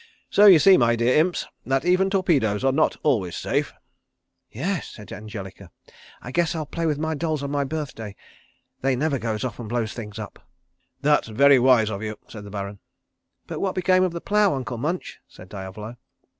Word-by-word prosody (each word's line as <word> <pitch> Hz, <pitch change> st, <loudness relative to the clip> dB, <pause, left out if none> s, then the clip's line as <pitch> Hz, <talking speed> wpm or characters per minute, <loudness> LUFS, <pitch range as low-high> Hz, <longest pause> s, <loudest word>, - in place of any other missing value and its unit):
So 205 Hz, +1 st, +6 dB
you 190 Hz, -4 st, +10 dB
see, 190 Hz, +5 st, +6 dB
my 120 Hz, -1 st, +3 dB
dear 120 Hz, +2 st, +2 dB
Imps, 175 Hz, +3 st, +1 dB, 0.2 s
that 135 Hz, +2 st, 0 dB
even 185 Hz, +2 st, +3 dB
torpedoes 150 Hz, -, +1 dB
are 135 Hz, -, +3 dB
not 155 Hz, +4 st, +1 dB
always 105 Hz, -, +1 dB
safe." -, -, -1 dB, 0.8 s
"Yes," 175 Hz, -, -3 dB
said 105 Hz, -2 st, -12 dB
Angelica. 100 Hz, -3 st, -8 dB, 0.5 s
"I 125 Hz, -, -7 dB
guess 170 Hz, +2 st, 0 dB
I'll 155 Hz, -1 st, -3 dB
play 165 Hz, +3 st, -3 dB
with 150 Hz, -2 st, 0 dB
my 160 Hz, +1 st, -2 dB
dolls 155 Hz, -1 st, -2 dB
on 140 Hz, -, -3 dB
my 145 Hz, -1 st, 0 dB
birthday. 135 Hz, -9 st, -5 dB, 0.7 s
They 135 Hz, 0 st, +1 dB
never 140 Hz, +1 st, 0 dB
goes 110 Hz, -2 st, -3 dB
off 125 Hz, -3 st, -4 dB
and 115 Hz, -3 st, -7 dB
blows 115 Hz, -2 st, -2 dB
things 105 Hz, -4 st, -8 dB
up." -, -, -8 dB, 0.6 s
"That's 150 Hz, -2 st, +3 dB
very 135 Hz, +4 st, +5 dB
wise 120 Hz, -4 st, +4 dB
of 100 Hz, -1 st, -5 dB
you," 110 Hz, -1 st, -5 dB
said 105 Hz, -2 st, -10 dB
the -, -, -9 dB
Baron. 100 Hz, 0 st, -6 dB, 0.7 s
"But -, -, -6 dB
what 190 Hz, -2 st, -1 dB
became 185 Hz, 0 st, +3 dB
of 185 Hz, -, +1 dB
the 170 Hz, 0 st, -6 dB
plough, 205 Hz, -4 st, +2 dB
Uncle 125 Hz, -3 st, -5 dB
Munch?" 170 Hz, +7 st, -3 dB
said 90 Hz, -, -15 dB
Diavolo. 105 Hz, +4 st, -8 dB
135 Hz, 190 wpm, -24 LUFS, 110-160 Hz, 0.8 s, you